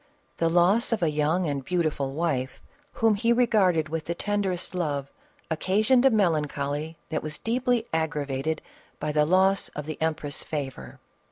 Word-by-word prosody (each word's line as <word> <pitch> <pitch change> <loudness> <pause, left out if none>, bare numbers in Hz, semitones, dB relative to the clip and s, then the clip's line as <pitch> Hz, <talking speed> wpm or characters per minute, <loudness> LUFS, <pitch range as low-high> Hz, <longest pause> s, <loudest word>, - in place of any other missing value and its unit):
The 165 - +2
loss 180 +9 +3
of 220 -6 0
a 160 - +2
young 155 +4 +1
and 140 -3 -2
beautiful 155 -5 -1
wife, 135 -5 -1 0.3
whom 225 -1 +3
he 230 +3 +1
regarded 205 -10 +3
with 160 0 -4
the 170 - -3
tenderest 195 -2 -2
love, 145 -6 -2 0.4
occasioned 215 +10 +3
a - - +6
mrl 195 -9 +3
ancholy 145 +2 -4
that 155 - -1
was 155 0 -6
deeply 245 0 0
aggravated 155 -2 -1 0.4
by 150 - -2
the 150 0 +2
loss 190 +2 +3
of 150 - -4
tl»e 155 0 -5
empress' 155 -3 -2
favor. 135 - -6
160 Hz, 160 wpm, -26 LUFS, 150-195 Hz, 0.4 s, a